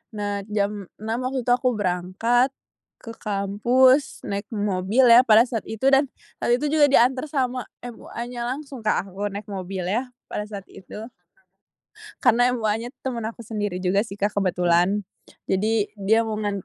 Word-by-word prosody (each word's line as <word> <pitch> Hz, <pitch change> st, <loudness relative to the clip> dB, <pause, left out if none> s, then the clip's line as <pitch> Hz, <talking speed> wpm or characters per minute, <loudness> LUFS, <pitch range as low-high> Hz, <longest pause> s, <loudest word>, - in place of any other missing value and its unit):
Nah, 205 Hz, -1 st, -2 dB
jam 205 Hz, -2 st, -2 dB
6:00 225 Hz, +4 st, -3 dB
waktu 260 Hz, -1 st, -3 dB
itu 245 Hz, -, 0 dB
aku 250 Hz, 0 st, +2 dB
berangkat 210 Hz, +7 st, 0 dB, 0.5 s
ke 230 Hz, -, -7 dB
kampus 235 Hz, +7 st, +2 dB
naik 200 Hz, +1 st, -4 dB
mobil 205 Hz, +2 st, +1 dB
ya, 235 Hz, +2 st, +9 dB
pada 220 Hz, 0 st, +7 dB
saat 240 Hz, -3 st, -4 dB
itu, 220 Hz, +4 st, -5 dB
dan 275 Hz, +1 st, +4 dB, 0.3 s
waktu 240 Hz, -, +2 dB
itu 290 Hz, +4 st, -2 dB
juga 300 Hz, -2 st, +5 dB
dianter 260 Hz, +1 st, +3 dB
sama 255 Hz, -3 st, -1 dB, 0.2 s
MUAnya 240 Hz, 0 st, -6 dB
langsung 270 Hz, +1 st, -5 dB
Kak 215 Hz, -3 st, -1 dB
aku 200 Hz, +3 st, -3 dB
naik 200 Hz, +1 st, -6 dB
mobil 190 Hz, -1 st, -4 dB
ya, 240 Hz, +5 st, -1 dB, 0.2 s
pada 210 Hz, -, -3 dB
saat 200 Hz, -2 st, -7 dB
itu. 210 Hz, +3 st, -10 dB, 1.2 s
Karena, 245 Hz, 0 st, +5 dB
MUAnya 225 Hz, +1 st, -1 dB
tuh, -, -, -46 dB
teman 235 Hz, -2 st, -5 dB
aku 235 Hz, 0 st, -12 dB
sendiri 205 Hz, -4 st, -3 dB
juga 190 Hz, +2 st, +3 dB
sih 200 Hz, -3 st, -9 dB
Kak, 205 Hz, +1 st, 0 dB
kebetulan. 180 Hz, +1 st, +2 dB, 0.4 s
Jadi, 210 Hz, +2 st, 0 dB
dia 220 Hz, +3 st, +2 dB
mau 220 Hz, -, -2 dB
ngan 205 Hz, -3 st, -3 dB
220 Hz, 160 wpm, -23 LUFS, 200-245 Hz, 1.2 s, ya